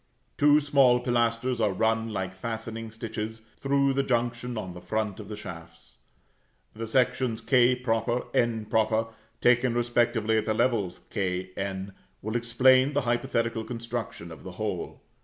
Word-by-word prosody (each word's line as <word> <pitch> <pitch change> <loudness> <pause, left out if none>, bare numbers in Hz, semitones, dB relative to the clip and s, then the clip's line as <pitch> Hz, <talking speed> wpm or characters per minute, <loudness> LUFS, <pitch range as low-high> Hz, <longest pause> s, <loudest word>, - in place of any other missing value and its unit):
Two 145 +1 +5
small 140 -4 +4
pilasters 120 0 0
are 105 -3 +2
run, 115 +3 +1
like 95 -3 -3
fastening 115 +2 -5
stitches, 110 0 -6 0.2
through 140 0 +2
the 140 - +2
junction 120 -1 -1
on 95 -4 -5
the 90 - -10
front 105 +2 -2
of 105 - -8
the 105 - -6
shafts. 85 -5 -11 0.8
The 115 +1 -5
sections 125 -1 +1
[=k] 125 -1 +3 0.5
[=n] 110 -1 +1 0.4
taken 125 0 +4
respectively 120 -2 +1
at 110 - -4
the 110 - 0
levels 110 -8 0
k, 95 -3 -2
n, 95 0 -4 0.3
will 110 +2 -3
explain 130 +3 +4
the 145 - +2
hypothetical 120 -2 0
construction 115 -7 -5
of 80 -3 -10
the 95 - -9
whole. 100 -3 -4
115 Hz, 140 wpm, -27 LUFS, 105-125 Hz, 0.8 s, Two